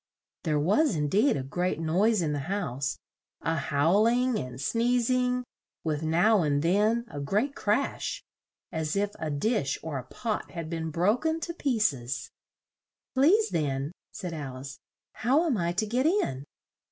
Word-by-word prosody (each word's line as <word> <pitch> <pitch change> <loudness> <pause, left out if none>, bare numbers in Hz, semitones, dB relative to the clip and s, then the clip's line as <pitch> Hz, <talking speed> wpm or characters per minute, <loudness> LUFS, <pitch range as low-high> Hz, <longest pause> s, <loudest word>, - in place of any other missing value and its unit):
There 155 -2 +2
was, 200 - +3
in 150 -1 0
deed, 210 - +3
a 135 - -3
great 175 +6 -1
noise 185 +5 +2
in 150 -2 0
the 145 - -1
house 140 - -2 0.4
a 165 - 0
howl 160 +8 +3
ing 245 0 +2
and 125 -1 -6
sneez 235 - +1
ing, 250 0 +1 0.4
with 155 -2 -1
now 175 +7 +4
and 145 -2 +1
then 210 +7 +2
a 145 - -7
great 210 - 0
crash, 220 +3 -1 0.5
as 160 0 -2
if 205 +1 +1
a 160 - -2
dish 145 - 0
or 155 -4 -3
a - - -7
pot 225 - -3
had 165 -2 -6
been 160 -1 -2
bro 180 +8 +2
ken 320 +3 -1
to 340 - -3
piec 235 - +2
es. 125 0 -5 0.8
"Please, 365 +12 +4
then," 140 -1 -1 0.2
said 180 -2 -6
Al 140 -5 -5
ice, 130 0 -8 0.3
"how 275 +9 +2
am 300 -7 +2
I 170 -4 0
to 200 +4 0
get 250 +7 +1
in?" 145 - 0
180 Hz, 170 wpm, -28 LUFS, 150-235 Hz, 0.8 s, now